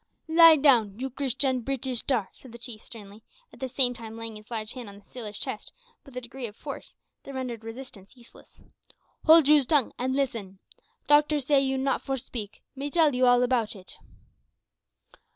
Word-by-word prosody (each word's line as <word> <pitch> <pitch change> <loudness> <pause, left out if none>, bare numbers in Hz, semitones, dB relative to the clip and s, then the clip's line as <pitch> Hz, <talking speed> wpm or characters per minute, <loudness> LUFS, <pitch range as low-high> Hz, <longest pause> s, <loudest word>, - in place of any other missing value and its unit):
"Lie 330 0 +8
down, 240 -9 +3
you 265 +2 -4
Christian 265 0 0
Breetish 260 -1 -2
tar," 235 -8 +1
said 255 - -15
the - - -9
Chief, 235 -2 -8
sternly, 210 -1 -12 0.3
at - - -15
the 260 - -4
same 250 -1 +3
time 225 -1 -9
laying 230 -1 -6
his 210 0 -13
large 220 -2 -4
hand 245 -5 -8
on 200 - -13
the 200 - -19
sailor's 215 -4 -8
chest - - -4 0.3
with 270 -3 -13
a - - -3
degree 245 +1 -6
of 210 - -12
force - - -9 0.3
that 275 - -10
rendered 245 -4 -5
resistance 225 -2 -11
useless. 235 -1 -19 0.6
"Hold 320 -2 +8
you's 295 -4 +5
tongue 290 -6 +2
an' 260 +1 -1
listen. 230 -8 -3 0.5
Doctor 295 0 +4
say 275 0 +2
you 265 0 0
not 265 0 0
for 270 -1 -3
speak. 220 -4 -7
Me 280 +2 -4
tell 310 -2 +3
you 250 0 +3
all 245 0 +5
about 240 -3 0
it. 185 -2 -13
250 Hz, 190 wpm, -27 LUFS, 225-270 Hz, 0.6 s, Lie